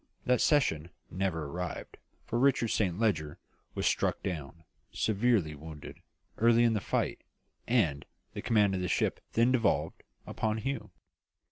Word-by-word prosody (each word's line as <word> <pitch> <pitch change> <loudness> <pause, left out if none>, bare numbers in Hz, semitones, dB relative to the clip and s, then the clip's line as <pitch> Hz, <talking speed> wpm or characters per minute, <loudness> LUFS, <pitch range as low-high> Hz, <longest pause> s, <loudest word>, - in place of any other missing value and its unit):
That 125 0 +3
season 85 - +2 0.2
never 90 -4 -1
arrived, 90 +4 -5 0.3
for 120 - -1
Richard 130 -3 +3
Saint 90 -6 0
Leger 80 -10 0 0.4
was - - -2
struck - - +1
down, 80 -2 -5 0.3
severely 110 -6 +1
wounded, 75 0 -10 0.4
early 115 +1 +5
in 115 -1 +4
the 105 - 0
fight, - - -1 0.5
and 85 - +2 0.3
the - - -5
command 105 -3 +3
of 95 - -1
the 90 - -1
ship - - 0
then 115 +2 +4
devolved 115 -5 +1 0.2
upon 110 0 -1
Hugh. 135 +2 -3
100 Hz, 140 wpm, -30 LUFS, 80-115 Hz, 0.5 s, early